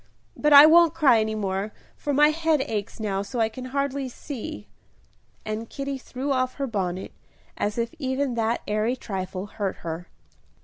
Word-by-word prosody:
But 300 - +1
I 285 +1 +11
won't 330 0 +6
cry 280 -8 +5
any 220 0 -1
more, 200 0 -2 0.2
for 290 - -3
my 295 +2 +5
head 320 -2 +1
aches 210 -4 -4
now 200 -3 -1
so 235 +5 -5
I 220 -1 +3
can 255 +3 -8
hardly 275 0 -2
see." 230 - -7 0.8
And 215 +1 -4
Kitty 275 -1 -4
threw 260 +2 -4
off 255 -1 0
her 280 - -2
bonnet, 190 -6 -3 0.4
as 210 +2 -2
if 235 0 -1
even 260 -1 -1
that 230 0 0
airy 215 +4 0
trifle 190 -5 -5
hurt 200 -2 -3
her. 165 +2 -5
235 Hz, 170 wpm, -25 LUFS, 210-280 Hz, 0.8 s, I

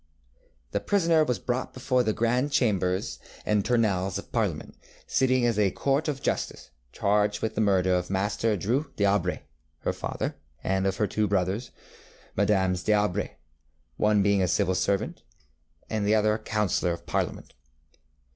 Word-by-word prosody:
ŌĆ£The 100 - -2
prisoner 165 -5 +4
was 125 -6 0
brought 125 +1 -3
before 130 0 +1
the 110 -3 +1
Grand 120 +6 +1
Chambers 95 -8 0 0.3
and 105 -1 +2
Tournelles 100 -6 +1
of - - -9
Parliament, - - -1 0.3
sitting 130 -2 +2
as 115 -3 +1
a 100 -2 +4
court 140 - 0
of 145 -2 -3
justice, - - -2 0.2
charged 105 +4 +1
with 110 -1 -1
the 110 - 0
murder 95 -3 +3
of 90 0 0
Master 105 +3 0
Dreux 130 - -1
dŌĆÖAubray, 100 -3 +1 0.4
her - - -1
father, - - -4 0.3
and 95 0 +1
of 95 0 -1
her 110 - +2
two 105 +2 0
brothers, 100 +4 0 0.7
MM. 95 -2 +2
dŌĆÖAubray, 105 +1 +1 0.7
one 105 -1 +3
being 100 -2 +3
civil 95 +1 +1
lieutenant, 95 +2 -1 0.7
and 110 -2 -2
the 110 - +4
other 105 0 +3
a 110 - -2
counsellor 105 -5 0
of 85 - -9
Parliament. - - -3
105 Hz, 150 wpm, -27 LUFS, 95-120 Hz, 0.7 s, prisoner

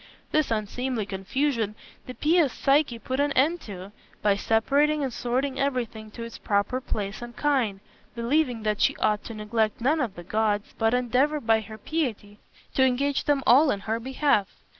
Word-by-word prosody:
This 310 -2 +2
unseemly 225 +1 -2
confusion 215 +3 -1 0.3
the 255 - -7
pious 315 -3 +3
Psyche 275 -3 +2
put 260 +4 -4
an 285 0 +2
end 315 +6 +2
to, 195 -1 -9 0.3
by 205 -1 +4
separating 280 +9 +2
and 260 -3 -2
sorting 260 +4 -1
everything 240 -5 -2
to 230 +2 -8
its 230 -1 -8
proper 205 +5 0
place 205 -4 -4
and 240 0 -8
kind, 250 -10 +1 0.3
believing 245 -1 0
that 210 -1 0
she - - +3
ought 210 -1 +1
to 230 - -7
neglect 215 0 -1
none 295 +6 +2
of 225 -7 -2
the 175 - -9
gods, 210 +2 -1
but 225 +1 +3
endeavor 255 +5 +1
by 225 -4 +2
her 215 +1 -10
piety 220 -6 -3 0.3
to 265 - +3
engage 265 +2 +1
them 285 -2 +2
all 280 +5 +6
in 200 -6 -1
her 225 +3 -2
behalf. 260 -4 +1
240 Hz, 175 wpm, -26 LUFS, 215-275 Hz, 0.3 s, all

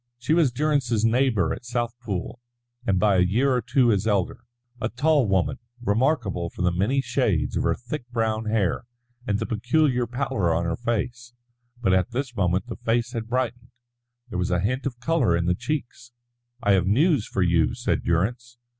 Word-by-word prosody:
She 125 +5 0
was 160 -6 +4
Durrance's 125 -5 +1
neighbour 115 -7 +2
at - - -7
Southpool, 120 -3 -4 0.5
and 95 -3 +2
by 100 -1 +3
a 90 - +5
year 120 +9 +2
or 125 - +1
two 125 +1 +2
his 105 -1 +1
elder 100 +3 0 0.4
a 110 - 0
tall 145 0 +2
woman, 95 -3 +1 0.2
remarkable 110 - 0
for 90 - -5
the 90 - +3
many 105 +10 +1
shades - - 0
of - - +1
her - - +1
thick 125 +1 -7
brown 110 -2 -1
hair 110 -1 0 0.4
and 100 - +1
the - - -2
peculiar 125 +2 +1
pallor 120 -9 0
on 85 +1 0
her 85 -1 -1
face. 120 +2 -3 0.5
But 95 - +3
at 95 +3 +2
this 125 0 -4
moment 95 -1 +1
the 125 - -7
face 120 +1 0
had 115 -1 -4
brightened, 120 -1 -2 0.6
there 90 - -3
was 90 - 0
a 90 - +1
hint 130 +9 -1
of 125 -3 -6
colour 125 - +2
in 85 - -1
the 90 - +3
cheeks. 120 0 -5 0.5
"I 100 - +3
have 95 -2 +3
news 140 - +3
for 95 - 0
you," 85 -3 +2
said - - -1
Durrance. 120 +8 -1
115 Hz, 185 wpm, -25 LUFS, 95-125 Hz, 0.6 s, a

